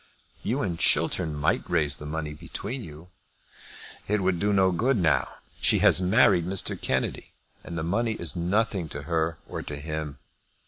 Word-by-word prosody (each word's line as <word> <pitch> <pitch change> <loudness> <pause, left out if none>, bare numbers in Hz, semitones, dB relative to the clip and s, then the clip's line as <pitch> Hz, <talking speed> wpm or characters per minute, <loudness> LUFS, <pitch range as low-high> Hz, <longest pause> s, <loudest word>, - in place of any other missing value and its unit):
"You 125 +7 -1
and 85 -4 -3
Chiltern 80 -2 +2
might 75 +5 +1
raise 75 -5 +1
the 75 - -8
money 75 0 -4
between 110 - -6
you." 80 +2 -11 1.0
"It 105 0 +1
would 90 -2 +1
do 105 +2 +1
no 95 -2 +4
good 120 +8 +1
now. 85 -5 +2 0.3
She - - +4
has - - +6
married 90 0 +4
Mr. 95 0 +2
Kennedy, - - -2 0.3
and 85 - -6
the 80 - -2
money 110 +7 0
is 85 -9 -1
nothing 95 0 0
to 75 0 -4
her 80 0 -1
or - - -5
to 75 - -6
him. 75 -1 -5
85 Hz, 170 wpm, -26 LUFS, 80-100 Hz, 1.0 s, has